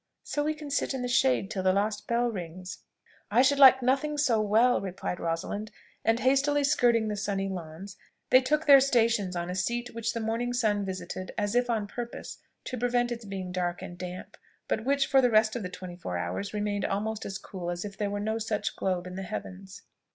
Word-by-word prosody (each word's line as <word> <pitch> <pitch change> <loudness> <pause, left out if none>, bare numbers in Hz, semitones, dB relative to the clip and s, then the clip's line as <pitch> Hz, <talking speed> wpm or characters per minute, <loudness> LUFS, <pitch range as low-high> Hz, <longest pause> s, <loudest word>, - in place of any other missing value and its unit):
So 290 - -2
we 310 +1 0
can 300 -2 -8
sit 275 - 0
in 255 - -3
the - - -1
shade 250 -4 +2
till 190 - -2
the 185 0 +3
last 210 +1 -1
bell 235 +1 +1
rings." 180 -1 -7 0.5
"I 235 +5 +4
should 280 +1 +3
like 265 -2 +8
nothing 275 +4 +1
so 250 -7 +2
well," 225 +4 +3
replied 185 -2 -4
Rosalind: 170 +6 -3 0.3
and 225 +1 +2
hastily 285 +2 +3
skirting 240 -6 +3
the 210 - -2
sunny 195 -1 -2
lawn, 175 -1 -6 0.5
they 255 - +8
took 300 +4 0
their 280 -2 +9
stations 230 -8 +2
on 175 0 -2
a 180 - -3
seat 240 +6 -2
which 230 0 -2
the 230 - -3
morning 230 +2 -1
sun 215 -4 +1
visited 185 0 -6
as 205 0 -1
if 245 0 +2
on 220 -3 0
purpose 235 +3 -7 0.2
to 250 - -5
prevent 245 0 +1
its 235 -2 -5
being 190 -2 -5
dark 180 0 -2
and 175 -2 -7
damp, 180 0 -7 0.3
but 220 - -1
which 280 0 +2
for 270 0 +4
the 250 - +4
rest 215 0 +3
of 240 - -2
the 180 - -4
twenty 180 -1 -8
four 90 - -4
hours 90 - -3
remained 205 -1 -2
almost 215 +2 -2
as 195 - -4
cool 180 -3 -7
as 175 +2 -3
if 200 -1 -7
there 205 0 -2
were 205 0 -3
no 220 +2 -1
such 215 -1 -2
globe 185 -2 -1
in 180 - -7
the 190 - -5
heavens. 190 +1 -7
215 Hz, 215 wpm, -28 LUFS, 190-245 Hz, 0.5 s, their